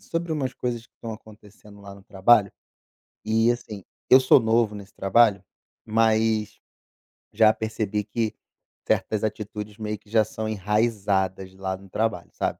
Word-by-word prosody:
sobre 165 -1 -3
umas 135 -4 -2
coisas 120 -2 -4
que - - -54
estão 115 - -7
acontecendo 105 -1 -15
lá 100 0 -11
no 100 - -16
trabalho, 100 +1 +3 0.7
e, 115 +2 +3
assim, 110 -5 -6 0.3
eu 130 - +9
sou 130 +1 +6
novo 115 -1 +2
nesse 100 -1 -10
trabalho, 100 -1 +3 0.4
mas 110 -1 +1 0.7
já 110 0 +5
percebi 110 -2 -3
que 110 +1 -2 0.5
certas 110 -1 0
atitudes 105 0 -5
meio 105 -1 -4
que 105 - -25
já 110 0 +4
são 110 +1 -5
enraizadas 100 -3 -1
lá 95 0 -4
no 95 - -16
trabalho, 110 -3 -2
sabe? - - -2
110 Hz, 150 wpm, -24 LUFS, 100-115 Hz, 0.7 s, eu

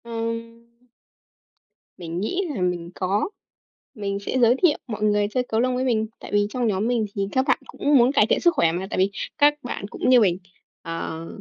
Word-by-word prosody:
Ừm. 230 0 -5 1.3
Mình 170 -1 -5
nghĩ 355 - -1
là 195 - -3
mình 175 -2 -1
có, 195 - 0 0.7
mình 200 -1 -3
sẽ 205 +5 -3
giới 240 0 +5
thiệu 315 -5 +5
mọi 215 -3 -4
người 210 -1 +2
chơi 255 +1 0
cầu 220 - +1
lông 250 +1 +1
với 255 - -1
mình. 220 -3 +1
Tại - - -10
vì 205 0 +2
trong 245 0 -1
nhóm 205 +1 0
mình 240 -3 +1
thì 195 -1 -1
các 260 0 +1
bạn - - +3
cũng 290 0 +2
muốn 245 +1 +5
cải 270 -7 +4
thiện - - +3
sức 345 - +4
khỏe 165 - +3
mà, 180 +3 -3
tại - - -3
vì 190 +2 +2 0.3
các 295 -1 +5
bạn 240 -5 -5
cũng - - -1
như 255 -1 +7
mình, 180 -4 +3 0.4
ờ, 165 -1 -5
220 Hz, 210 wpm, -23 LUFS, 195-250 Hz, 1.3 s, như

